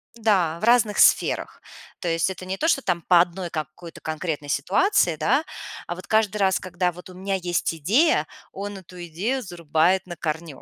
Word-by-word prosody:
да, 190 -8 +1
в - - 0
разных 235 -3 +3
сферах. - - +3 0.4
То - - -4
есть 165 +2 +1
это 185 0 -7
не 190 +1 -4
то 320 - 0
что 275 -4 +3
там 175 -2 0
по 175 +1 +5
одной 175 0 -3
какой-то 155 +2 -7
конкретной 155 -2 -4
ситуации, 180 - +2
да, 275 - +2 0.4
а 175 - -3
вот 185 +2 -10
каждый 215 -1 +2
раз, 190 -1 +2
когда 180 0 -1
вот 180 +2 -12
у 185 - -12
меня 195 +2 -3
есть 175 -2 -1
идея, 225 - +2 0.2
он 200 +1 -6
эту 180 -1 -11
идею 210 +12 -2
зарубает 170 +1 +1
на 175 - -6
корню. 155 -3 -4
180 Hz, 185 wpm, -24 LUFS, 170-205 Hz, 0.4 s, по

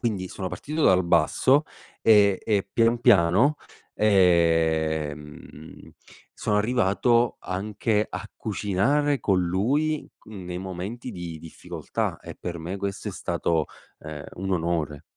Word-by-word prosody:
Quindi 105 -6 -2
sono 95 0 -5
partito 155 - -4
dal 90 -1 +4
basso, 130 - +3 0.4
ehm, 100 -3 +5
e 105 -3 +1
pian 115 +1 +3
piano, 115 - +4 0.4
ehm, 80 -6 0 0.4
sono 105 - -1
arrivato 115 +1 +2
anche 105 +3 -1
a 95 +4 -7
cucinare 120 +8 0
con 95 -4 +2
lui 135 - 0
c - - -30
nei 90 -4 -7
momenti 95 +7 -6
di 85 -4 -7
difficoltà 85 -1 -5
e - - -9
per 85 -1 -6
me 85 +4 -5
questo 100 0 -4
è - - -3
stato, 80 -2 -1 0.3
ehm, 75 -1 -8
un 95 +1 -4
onore. 80 -4 -1
95 Hz, 125 wpm, -25 LUFS, 85-110 Hz, 0.4 s, ehm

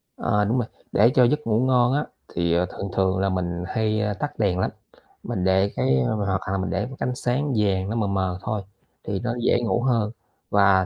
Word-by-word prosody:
Ờ, 105 0 +1
đúng 115 +5 +1
rồi. 115 -3 0 0.2
Để 115 +5 +5
cho 125 - +6
giấc 150 +1 +1
ngủ 110 0 +2
ngon 125 -1 +3
á 145 - +1 0.2
thì, 85 -1 0
ờ, 90 +1 +2
thường 100 +2 -6
thường 95 -1 +2
là 100 0 +1
mình 90 -1 -2
hay, 110 -1 0
ơ, 105 -1 0
tắt 145 +3 -5
đèn 95 -4 +1
lắm, - - 0 0.5
mình 90 - -3
để 95 +2 +3
cái, 65 +1 +2
ơ 65 - 0
hoặc 100 -2 -1
hà 95 0 -1
mình 95 - -2
để 100 +2 -1
một 135 +1 -8
cái - - -1
ánh 125 - -3
sáng 130 +3 -1
vàng 95 -2 +1
nó 115 - -2
mờ 110 -3 0
mờ 95 -2 -1
thôi 105 -2 -2 0.4
thì 95 -1 -2
nó 120 0 -2
dễ - - +4
ngủ 120 0 0
hơn 115 -5 +1 0.4
và 100 -2 +4
100 Hz, 240 wpm, -24 LUFS, 95-120 Hz, 0.5 s, cho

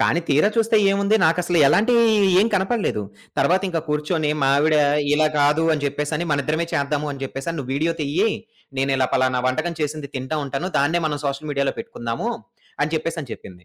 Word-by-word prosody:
కానీ 170 - +2
తీరా 150 +8 +4
చూస్తే 225 0 +3
ఏముంది? 200 +2 +2
నాకసలు 175 +1 +1
ఎలాంటివి 235 - +4 0.4
ఏమి 220 +4 +3
కనపడలేదు. 195 - 0 0.4
తరువాత 180 +8 +2
ఇంకా 165 -2 -2
కూర్చొని 150 +1 0
మా - - +3
ఆవిడ 155 +1 +3 0.4
ఇలా 155 +1 +3
కాదు 150 +3 +3
అని 150 -2 -2
చెప్పేసని, 150 +4 -2
మన 140 -1 +1
ఇద్దరమే 155 +3 -1
చేద్దాము 145 +1 -1
అని 140 -1 -7
జెప్పేసని, 135 +5 -5
"నువ్వు 130 -1 -5
వీడియో 160 +4 0
తియ్యి, 165 +10 +1 0.5
నేను 135 +1 +1
ఇలా 130 -1 +2
పలానా 130 -1 +2
వంటకం 160 +6 -1
చేసింది 150 -1 -3
తింటా 130 +4 -3
ఉంటాను. 140 +6 -4
దాన్నే 160 +5 +1
మనం 145 -1 -2
సోషల్ 140 +2 -4
మీడియాలో 140 -1 -1
పెట్టుకుందాము" 220 - -4 0.5
అని 150 +2 -1
చెప్పేసని 160 -5 -4
చెప్పింది. 90 -1 -12
150 Hz, 175 wpm, -22 LUFS, 140-175 Hz, 0.5 s, తీరా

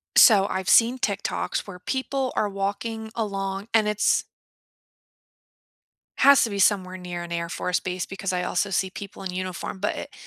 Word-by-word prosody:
So, 200 -4 +7
I've 190 0 -3
seen 240 +2 +5
TikToks 205 -3 -2
where 180 -2 -9
people 265 +3 -2
are 210 - +1
walking 220 +3 -4
along, 195 -2 -3
and 220 -2 +4
it's 210 0 +2 1.9
has 280 +1 +7
to 230 - 0
be 200 - -4
somewhere 185 -2 +2
near 180 -1 -6
an 170 - -9
Air 170 0 -2
Force 180 0 -1
base 180 -1 -3
because 195 0 -4
I 180 0 -1
also 180 +2 -1
see 190 0 0
people 200 +1 -9
in 185 - -4
uniform, 185 +1 -5
but 205 - -1
it - - -7
195 Hz, 170 wpm, -25 LUFS, 185-220 Hz, 1.9 s, So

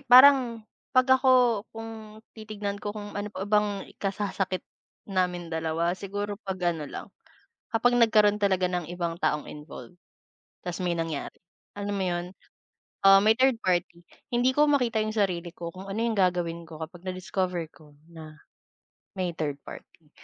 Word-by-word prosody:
parang 250 -3 +7 0.3
'pag 255 - +7 0.2
ako 260 - +2 0.4
kung 225 -1 -9 0.2
titignan 210 -2 -5
ko, 205 0 -5
kung 205 -1 -7
ano 205 +1 -3
pa 195 -2 -5
bang 205 -1 +1
ikasasakit 195 -2 -2 0.4
naming 180 -3 -1
dalawa, 160 +1 0
siguro 205 +2 -4
'pag 185 -4 -1
ano 155 -3 -6
lang, - - -7 0.7
kapag 245 +2 +3
nagkaroon 215 -3 +5
talaga 190 -3 +2
ng 180 -2 -2
ibang 170 -1 -3
taong 150 -3 -1
involved. 150 +4 -11 0.7
Ta's 180 0 -4
may 180 -2 0
nangyari. 165 -3 -3 0.4
Alam 205 0 -3
mo - - 0
yun, 175 0 -2 0.7
ah, 195 0 +9
may 220 +1 +5
third 255 -1 +3
party. 175 -1 0 0.3
Hindi 245 +1 +3
ko 295 - +5
makita 250 -6 +2
yung 215 - -2
sarili 180 -5 0
ko 170 -1 -6
kung 185 - -8
ano 195 +2 -3
yung 230 -1 0
gagawin 175 -2 +1
ko 160 -1 -10
kapag 170 +2 -10
na-discover 185 -1 -2
ko 150 -2 -19 0.2
na 155 -2 -11 0.8
may 180 -2 -1
third 145 -3 -2
party. 160 -3 -12
190 Hz, 155 wpm, -27 LUFS, 175-215 Hz, 0.8 s, ah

